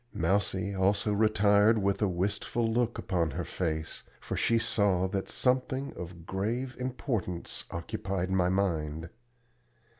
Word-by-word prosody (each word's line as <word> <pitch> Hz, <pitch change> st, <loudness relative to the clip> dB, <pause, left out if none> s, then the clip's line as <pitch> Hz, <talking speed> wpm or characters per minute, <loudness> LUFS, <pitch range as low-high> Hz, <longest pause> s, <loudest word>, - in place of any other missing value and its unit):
Mousie 100 Hz, -1 st, +1 dB
also 100 Hz, +2 st, +2 dB
retired 105 Hz, +1 st, +4 dB
with 100 Hz, 0 st, 0 dB
a 105 Hz, -, +4 dB
wistful 100 Hz, +5 st, -1 dB
look 120 Hz, +1 st, +1 dB
upon 85 Hz, -4 st, 0 dB
her 85 Hz, +5 st, -3 dB
face, 80 Hz, -2 st, -3 dB, 0.2 s
for -, -, -4 dB
she 115 Hz, -, +3 dB
saw 100 Hz, -5 st, +2 dB
that 95 Hz, 0 st, -3 dB
something 130 Hz, +1 st, 0 dB
of 85 Hz, -1 st, -8 dB
grave 115 Hz, +8 st, -2 dB
importance 125 Hz, -, -3 dB
occupied 95 Hz, +2 st, -3 dB
my 90 Hz, -1 st, +3 dB
mind. 80 Hz, -4 st, -1 dB
100 Hz, 125 wpm, -30 LUFS, 90-110 Hz, 0.2 s, retired